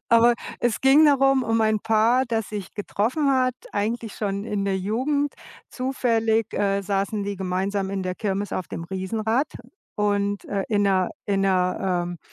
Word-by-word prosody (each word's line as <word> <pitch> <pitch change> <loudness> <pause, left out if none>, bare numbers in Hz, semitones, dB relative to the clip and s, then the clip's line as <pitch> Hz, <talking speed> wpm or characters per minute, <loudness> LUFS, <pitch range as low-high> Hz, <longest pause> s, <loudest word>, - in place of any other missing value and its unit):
Aber 235 +1 +6 0.3
es 240 -2 0
ging 275 +4 +6
darum 270 -2 +4
um 225 0 +1
ein 215 -1 +2
Paar, 225 +4 +3
das 225 -3 -2
sich 205 -3 -6
getroffen 240 +8 0
hat, 255 -1 +2 0.2
eigentlich 220 +1 -2
schon 200 -1 -3
in 205 -3 -2
der 195 -1 0
Jugend. 270 +9 -1 0.4
Zufällig, 225 -4 0
äh, 200 -1 +1
saßen 200 +1 -1
die 200 -1 -3
gemeinsam 190 +1 -1
in 195 -1 -2
der 185 0 -3
Kirmes 200 0 -2
auf 185 - -3
dem - - -5
Riesenrad 215 - -1 0.5
und, 205 -1 0
äh, 200 -1 -2
in 205 -2 +2
der 190 -2 +2 0.2
in 195 -1 +1
der, 185 -1 +1 0.3
ähm, 175 -1 -7
210 Hz, 165 wpm, -24 LUFS, 195-235 Hz, 0.5 s, Aber